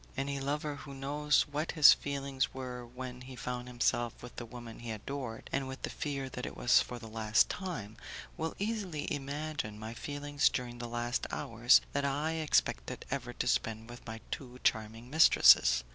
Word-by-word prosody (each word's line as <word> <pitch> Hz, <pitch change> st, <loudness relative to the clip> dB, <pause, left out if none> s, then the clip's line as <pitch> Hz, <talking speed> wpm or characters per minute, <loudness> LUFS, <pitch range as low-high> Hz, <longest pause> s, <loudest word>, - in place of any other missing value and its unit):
Any 140 Hz, +1 st, -1 dB
lover 145 Hz, +1 st, -2 dB
who 140 Hz, -1 st, -9 dB
knows 145 Hz, +2 st, +2 dB
what 150 Hz, +2 st, -3 dB
his 155 Hz, -4 st, +9 dB
feelings 140 Hz, -2 st, -2 dB
were 125 Hz, -2 st, -5 dB
when 125 Hz, +1 st, -8 dB
he 130 Hz, +1 st, -9 dB
found 125 Hz, 0 st, -4 dB
himself 120 Hz, -1 st, 0 dB
with 120 Hz, -, -10 dB
the 120 Hz, -, -5 dB
woman 120 Hz, -1 st, -9 dB
he 120 Hz, -, -7 dB
adored 115 Hz, +2 st, -5 dB
and 135 Hz, -1 st, 0 dB
with 130 Hz, 0 st, -8 dB
the -, -, -2 dB
fear 140 Hz, -2 st, -3 dB
that 125 Hz, -1 st, -7 dB
it -, -, -8 dB
was 120 Hz, -, +5 dB
for 125 Hz, -, -5 dB
the 115 Hz, -, -10 dB
last 110 Hz, 0 st, +2 dB
time, 150 Hz, -, -5 dB, 0.4 s
will 160 Hz, 0 st, -3 dB
easily 200 Hz, -7 st, -2 dB
imagine 145 Hz, -5 st, -4 dB
my 110 Hz, +1 st, -6 dB
feelings 145 Hz, +3 st, 0 dB
during 120 Hz, -1 st, -4 dB
the 120 Hz, -, -4 dB
last 120 Hz, +1 st, -2 dB
hours 115 Hz, +2 st, +4 dB
that 140 Hz, -, 0 dB
I 145 Hz, +3 st, 0 dB
expected 155 Hz, -, 0 dB
ever 130 Hz, -3 st, -2 dB
to 120 Hz, -, -2 dB
spend 115 Hz, -1 st, 0 dB
with 120 Hz, -, -11 dB
my 110 Hz, 0 st, -6 dB
two 125 Hz, -2 st, -6 dB
charming 110 Hz, +3 st, 0 dB
mistresses. 60 Hz, -, +7 dB
130 Hz, 180 wpm, -32 LUFS, 120-145 Hz, 0.4 s, his